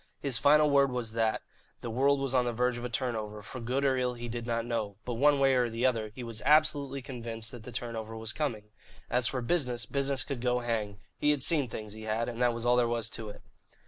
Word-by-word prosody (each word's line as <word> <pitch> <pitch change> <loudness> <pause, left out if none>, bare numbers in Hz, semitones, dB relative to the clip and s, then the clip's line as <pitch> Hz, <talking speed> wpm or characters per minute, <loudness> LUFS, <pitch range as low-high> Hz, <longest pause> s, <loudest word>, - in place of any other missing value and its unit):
His 135 -5 +1
final 150 +1 +5
word 140 -2 +4
was 120 -3 -2
that, 115 -1 0 0.4
the 115 - -4
world 135 +4 +2
was 135 -1 -1
on 125 -1 +3
the 120 - -1
verge 125 +1 +1
of - - -8
a 125 - -3
turnover, 110 -3 -3
for 130 +5 -8
good 125 +4 -1
or 135 -1 +3
ill 125 -1 0
he 120 0 -6
did 120 0 -5
not 115 -1 -1
know, 110 -4 -2
but, 125 - -3
one 145 +5 +4
way 135 -1 +4
or 125 -2 +2
the 115 +2 -1
other, 115 -4 +1
he 125 - -6
was 115 -2 -5
absolutely 145 -2 +3
convinced 115 -3 -5
that 120 - -9
the 125 - -8
turnover 115 -2 -5
was 110 0 -5
coming. 110 -9 -3 0.4
As 125 -1 +3
for 125 -1 -2
business, 125 -6 0
business 140 +2 0
could 135 -4 -5
go 125 0 +1
hang. 110 -4 -2 0.2
He 150 - +2
had 145 -3 +2
seen 150 -5 +4
things, 110 -2 -6
he 110 0 -8
had, 110 +2 -1
and 120 0 -5
that 120 -1 +4
was 115 0 -4
all 120 0 +4
there 120 -1 +3
was 115 -1 -1
to 110 -1 -5
it. 105 - -11
120 Hz, 250 wpm, -30 LUFS, 115-135 Hz, 0.4 s, final